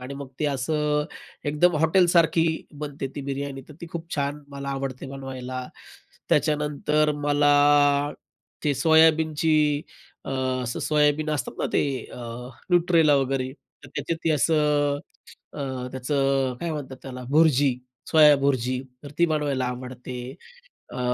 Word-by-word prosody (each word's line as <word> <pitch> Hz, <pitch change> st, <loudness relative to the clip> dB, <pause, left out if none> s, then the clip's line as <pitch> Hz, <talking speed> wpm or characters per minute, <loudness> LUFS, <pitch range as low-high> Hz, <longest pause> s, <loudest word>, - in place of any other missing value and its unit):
आणि 130 Hz, +2 st, -7 dB
मग 140 Hz, -1 st, -7 dB
ते -, -, +1 dB
असं 150 Hz, +2 st, 0 dB, 0.4 s
एकदम 150 Hz, +4 st, +2 dB
हॉटेलसारखी 165 Hz, 0 st, +4 dB, 0.3 s
बनते 145 Hz, -2 st, -4 dB
ती -, -, -4 dB
बिर्याणी, 140 Hz, 0 st, -4 dB
तर 150 Hz, -, -12 dB
ती 170 Hz, -, -7 dB
खूप 170 Hz, 0 st, -6 dB
छान 145 Hz, 0 st, -2 dB
मला 140 Hz, 0 st, -7 dB
आवडते 135 Hz, -1 st, -4 dB
बनवायला. 130 Hz, -2 st, -6 dB, 0.6 s
त्याच्यानंतर 150 Hz, +1 st, +1 dB
मला 145 Hz, 0 st, +3 dB, 0.5 s
ते 145 Hz, -1 st, +2 dB
सोयाबीनची 155 Hz, -1 st, +3 dB, 0.4 s
अ, -, -, -6 dB, 0.3 s
असं 120 Hz, -1 st, -4 dB
सोयाबीन 150 Hz, 0 st, +2 dB
असतात 145 Hz, -5 st, -2 dB
ना, -, -, 0 dB
ते -, -, +3 dB, 0.3 s
अ, -, -, -9 dB, 0.5 s
न्यूट्रेला, 170 Hz, -4 st, +4 dB
वगैरे, 135 Hz, -1 st, 0 dB
तर 145 Hz, -, -19 dB
त्याच्यात 165 Hz, -, -3 dB
ती 165 Hz, -, +2 dB
असं 150 Hz, -1 st, +2 dB, 0.5 s
अ, -, -, -9 dB, 0.3 s
त्याचं 135 Hz, 0 st, 0 dB
अ, -, -, -8 dB
काय 170 Hz, -, -2 dB
म्हणतात 135 Hz, -3 st, -6 dB
त्याला 125 Hz, -1 st, -8 dB
भुर्जी, 145 Hz, -3 st, +3 dB, 0.3 s
सोयाभुर्जी 140 Hz, -5 st, +4 dB, 0.2 s
तर 145 Hz, -, -9 dB
ती 170 Hz, -, +5 dB
बनवायला 145 Hz, -5 st, 0 dB
आवडते. 125 Hz, 0 st, -6 dB, 0.8 s
अ, -, -, -6 dB
145 Hz, 130 wpm, -25 LUFS, 135-155 Hz, 0.8 s, ती